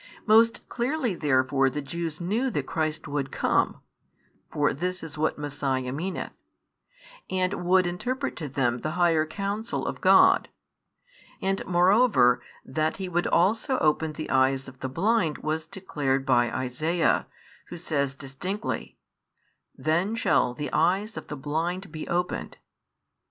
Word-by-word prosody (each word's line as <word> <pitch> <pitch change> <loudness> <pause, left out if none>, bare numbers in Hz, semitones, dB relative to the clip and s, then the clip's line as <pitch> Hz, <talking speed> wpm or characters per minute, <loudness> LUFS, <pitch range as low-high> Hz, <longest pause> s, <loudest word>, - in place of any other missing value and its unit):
Most 225 +1 +4
clearly 250 -1 -1
therefore 135 -3 +2
the 145 - -4
Jews 155 +2 -4
knew 215 +10 0
that 145 - -2
Christ 155 0 -2
would 140 -2 -2
come, - - +1 0.7
(for 145 -1 +1
this 180 +5 -3
is 160 -2 -8
what 155 +1 0
Messiah 135 -3 -2
meaneth), 175 +8 -4 1.0
and 185 0 -1
would 185 +1 +4
interpret 250 +10 -2
to 150 -4 -5
them 125 -3 0
the 155 +4 -3
higher 165 -3 +3
counsel 200 +6 -3
of - - -4
God; - - +6 0.9
and 195 0 -1
moreover 180 - +4 0.2
that 155 +3 -1
He 190 -1 -4
would 175 0 0
also 220 +9 +2
open 155 0 +1
the 155 +1 -6
eyes 135 0 +2
of 130 0 -12
the 130 - -4
blind 175 - +1
was 155 +1 -3
declared 140 -7 -2
by 120 -3 +3
Isaiah, 155 +7 0 0.4
who 175 - -8
says 140 -5 -1
distinctly: 150 +10 -5 0.8
Then 175 +8 0
shall 125 - +2
the 145 +1 -5
eyes 190 +7 +1
of - - -7
the 150 - -6
blind 165 +6 -3
be 155 -1 -6
opened. 180 +1 -2
160 Hz, 140 wpm, -26 LUFS, 140-185 Hz, 1.0 s, God